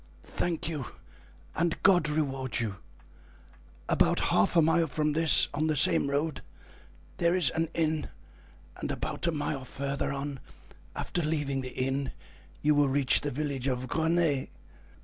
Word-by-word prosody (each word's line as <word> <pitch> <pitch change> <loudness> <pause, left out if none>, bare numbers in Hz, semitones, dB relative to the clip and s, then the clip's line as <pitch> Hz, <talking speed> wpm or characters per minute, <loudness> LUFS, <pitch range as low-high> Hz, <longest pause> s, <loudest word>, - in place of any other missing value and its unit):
"Thank 170 -2 -3
you, 150 -6 -4 0.7
and 170 0 0
God 175 -6 +4
reward 135 -4 -2
you! 105 -5 -3 1.1
About - - +2
half 100 - +2
a 165 - +6
mile 165 +1 +2
from 150 +1 -1
this, 160 0 +6
on 155 +2 0
the 155 - +1
same 140 0 +4
road, 145 +2 -1 0.8
there 170 +1 +2
is 170 -8 +2
an 165 0 -1
inn, 160 -2 -1 0.7
and - - -5
about - - -3
a - - +2
mile 145 -3 -3
further 140 +1 -3
on, 140 0 -5 0.6
after 175 - -3
leaving 145 -4 -1
the 130 0 -8
inn, 135 +1 -2 0.5
you 150 +1 +4
will 145 -1 +3
reach 135 -1 +3
the 145 - -2
village 140 -1 -3
of 130 -1 -1
Greney. 160 -1 0
145 Hz, 150 wpm, -28 LUFS, 135-160 Hz, 1.1 s, a